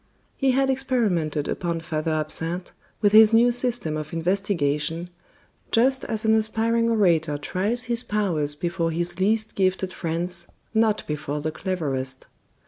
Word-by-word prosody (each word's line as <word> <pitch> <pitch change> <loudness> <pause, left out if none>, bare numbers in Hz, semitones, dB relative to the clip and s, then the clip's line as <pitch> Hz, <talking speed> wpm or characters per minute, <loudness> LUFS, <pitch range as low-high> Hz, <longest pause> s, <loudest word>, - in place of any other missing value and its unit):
He 270 - +1
had 270 +1 +2
experimented 205 - 0
upon 170 -2 -2
Father 155 -1 -3
Absinthe 165 +3 -3 0.3
with 205 - +4
his 220 +1 +7
new 240 +2 +5
system 240 -10 0
of 155 +1 -6
investigation, 165 -2 -1 0.6
just 260 +3 +2
as 220 0 -1
an 220 - +4
aspiring 225 +1 +1
orator 170 -9 +2
tries 200 +11 0
his 240 -1 0
powers 185 -11 -1
before 170 +1 -2
his 175 +2 -2
least 215 +3 +1
gifted 185 -1 0
friends, 170 +1 -3 0.3
not 220 -1 +2
before 150 -1 -3
the 155 +2 -3
cleverest. 140 -8 -3
185 Hz, 135 wpm, -24 LUFS, 160-220 Hz, 0.6 s, his